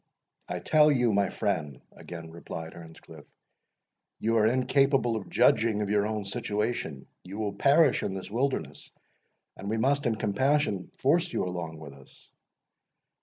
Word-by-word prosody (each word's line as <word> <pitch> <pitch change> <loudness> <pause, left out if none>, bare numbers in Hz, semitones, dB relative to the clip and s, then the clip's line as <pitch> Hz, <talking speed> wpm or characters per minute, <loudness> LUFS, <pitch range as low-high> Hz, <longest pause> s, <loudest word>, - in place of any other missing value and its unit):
"I 90 - -3
tell 150 - +4
you, 125 -5 +2
my 100 0 +2
friend," 75 -10 -2
again 85 -2 -10
replied 80 -1 -8
Earnscliff, 80 -1 -13 0.9
"you 115 +1 0
are 110 0 +4
incapable 130 0 +2
of 105 -3 -5
judging 110 -2 +3
of 100 - -3
your 105 0 +2
own 110 -2 -3
situation 105 - -3 0.2
you 95 +3 -8
will 105 -2 -2
perish 140 +10 +4
in 95 - -3
this 95 +1 -7
wilderness, 115 - -2 0.7
and 100 - -6
we 110 - 0
must, 140 +4 +1
in 115 - +1
compassion, 110 -1 0
force 170 +6 +1
you - - -1
along 85 -3 -5
with 75 -3 -10
us." 70 -1 -18
105 Hz, 150 wpm, -28 LUFS, 90-130 Hz, 0.9 s, tell